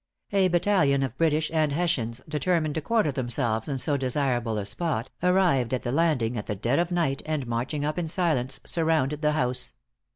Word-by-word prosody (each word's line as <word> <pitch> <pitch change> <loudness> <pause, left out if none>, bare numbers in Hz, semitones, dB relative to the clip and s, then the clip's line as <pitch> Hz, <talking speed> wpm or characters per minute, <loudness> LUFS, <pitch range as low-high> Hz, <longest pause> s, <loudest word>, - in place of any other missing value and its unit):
A 195 -2 +3
battalion 175 -6 +2
of 130 -3 -3
British 155 0 +1
and 155 -2 +2
Hessians, 130 -8 -1
determined 155 0 0
to 160 - -2
quarter 215 -3 +1
themselves 120 -3 0
in 135 - -1
so 140 +3 +2
desirable 125 -4 -1
a 100 - -3
spot, 125 - -3
arrived 175 -10 +2
at 125 - -5
the 120 - -2
landing 135 -6 +1
at 105 - -5
the 105 - -2
dead 120 - 0
of 175 +1 0
night, 160 -6 0
and 155 -4 -2
marching 125 +5 -2
up 150 +3 -2
in 170 - -2
silence, 155 -7 0
surrounded 155 -3 +1
the 150 -1 +2
house. 125 -4 +1
145 Hz, 190 wpm, -26 LUFS, 125-165 Hz, -, A